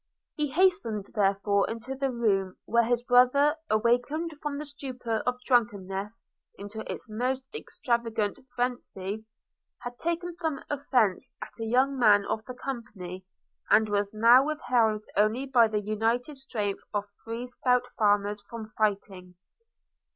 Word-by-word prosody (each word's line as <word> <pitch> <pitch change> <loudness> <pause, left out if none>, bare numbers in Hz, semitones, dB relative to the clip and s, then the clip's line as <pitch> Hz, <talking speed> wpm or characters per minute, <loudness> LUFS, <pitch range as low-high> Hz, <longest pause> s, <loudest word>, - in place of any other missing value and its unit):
He 300 -2 -1
hastened 265 - +2
therefore 200 -1 +2
into 230 +4 -5
the 270 0 -1
room, 200 -6 0
where 235 0 +3
his 240 0 +1
brother, 255 +4 +5
awakened 245 +9 +1
from 295 -2 -3
the 300 - -5
stupor 255 -6 -4
of 250 0 0
drunkenness 210 -3 0 0.3
into 205 +2 -8
its - - -7
most 250 +4 -1
extravagant 235 - -2 0.2
phrensy, 220 -4 -3 0.6
had 245 -1 -7
taken 340 +1 -2
some 320 -5 -3
offence 250 -4 +1
at - - -12
a 225 - -2
young 260 +4 +2
man 205 -4 +5
of 220 - -2
the 250 - -7
company, 195 -9 -7 0.4
and 215 +1 +5
was 205 -1 0
now 230 +4 +6
withheld 240 -8 +1
only 215 +6 +2
by 245 -4 +5
the 215 -1 -1
united 225 +7 -1
strength 220 -7 -3
of 205 - +1 0.2
three 230 +2 -4
stout 250 0 +1
farmers 205 -1 +2
from 220 -2 -8
fighting. 195 -4 -2
230 Hz, 135 wpm, -28 LUFS, 210-260 Hz, 0.6 s, now